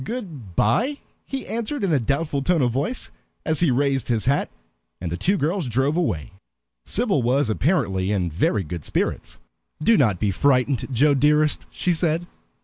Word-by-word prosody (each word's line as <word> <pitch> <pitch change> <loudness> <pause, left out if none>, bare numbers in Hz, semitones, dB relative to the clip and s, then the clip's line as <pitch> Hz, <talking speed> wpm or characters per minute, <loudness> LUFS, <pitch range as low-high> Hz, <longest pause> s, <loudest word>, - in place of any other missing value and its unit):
"Good 150 - -7
by," 240 - +2 0.3
he 270 -1 -4
answered 230 +3 -3
in 185 -5 +1
a 145 - +3
doubtful 140 +4 -1
tone 165 0 +2
of 120 - +2
voice, 145 - -2 0.3
as 160 -1 +1
he 170 - +3
raised 135 +1 +1
his 115 -3 0
hat; 140 +3 +1 0.5
and 85 -2 -4
the - - -1
two 195 - +1
girls 165 0 -1
drove 135 +5 +1
away. 100 - -1 0.5
Sybil 205 - +1
was 125 0 +1
apparently 105 - 0
in 90 -5 0
very 95 +5 +1
good 85 -1 -6
spirits. - - -2 0.5
"Do 230 +7 +5
not 105 -10 +2
be 105 -2 +1
frightened, 130 +2 +1
Joe 145 +4 +4
dearest," 150 +2 +2
she 180 - -1
said. 165 0 0
140 Hz, 170 wpm, -23 LUFS, 115-170 Hz, 0.5 s, Do